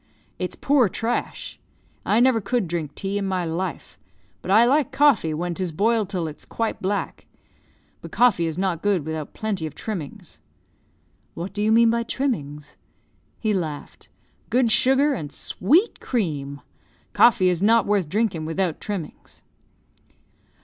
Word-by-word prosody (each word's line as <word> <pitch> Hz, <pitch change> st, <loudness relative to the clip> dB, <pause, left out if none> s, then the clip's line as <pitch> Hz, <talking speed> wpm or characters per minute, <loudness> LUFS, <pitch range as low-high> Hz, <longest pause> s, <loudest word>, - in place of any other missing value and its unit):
it's -, -, -3 dB
poor 275 Hz, -7 st, +3 dB
trash. 230 Hz, +6 st, -3 dB, 0.5 s
I 215 Hz, -, +3 dB
never 245 Hz, -2 st, +4 dB
could 220 Hz, -1 st, -1 dB
drink 160 Hz, -4 st, -4 dB
tea 200 Hz, +1 st, -2 dB
in 200 Hz, -, -2 dB
my 185 Hz, -2 st, -1 dB
life. 170 Hz, +3 st, -5 dB, 0.4 s
But -, -, -8 dB
I 220 Hz, +4 st, +6 dB
like 280 Hz, +4 st, +2 dB
coffee, 270 Hz, -, +3 dB
when 170 Hz, +3 st, -2 dB
'tis 180 Hz, 0 st, -3 dB
boiled 215 Hz, +4 st, +1 dB
till 180 Hz, -5 st, -2 dB
it's 150 Hz, -, -9 dB
quite 225 Hz, -1 st, -3 dB
black. 200 Hz, +2 st, -3 dB, 0.7 s
But -, -, -10 dB
coffee 215 Hz, -9 st, +3 dB
is 160 Hz, 0 st, -4 dB
not 185 Hz, -3 st, -1 dB
good 195 Hz, -7 st, +1 dB
without 160 Hz, -1 st, -5 dB
plenty 200 Hz, -7 st, -3 dB
of 150 Hz, -, -11 dB
trimmings." 180 Hz, -10 st, -7 dB, 1.0 s
"What 180 Hz, +3 st, -6 dB
do 205 Hz, -, -3 dB
you 215 Hz, +1 st, +2 dB
mean 230 Hz, 0 st, +5 dB
by 235 Hz, 0 st, 0 dB
trimmings?" 150 Hz, -, -3 dB, 0.6 s
He 215 Hz, -2 st, 0 dB
laughed. 155 Hz, -6 st, -5 dB, 0.4 s
"Good 245 Hz, -2 st, +2 dB
sugar, 265 Hz, +5 st, +3 dB
and 150 Hz, -, -5 dB
sweet 340 Hz, -, +1 dB
cream. 145 Hz, -, -3 dB, 0.5 s
Coffee 220 Hz, -6 st, +5 dB
is 175 Hz, -1 st, -1 dB
not 225 Hz, +1 st, +4 dB
worth 200 Hz, -6 st, 0 dB
drinking 195 Hz, -5 st, -1 dB
without 165 Hz, 0 st, -2 dB
trimmings." 195 Hz, -7 st, -7 dB
195 Hz, 150 wpm, -23 LUFS, 165-230 Hz, 1.0 s, I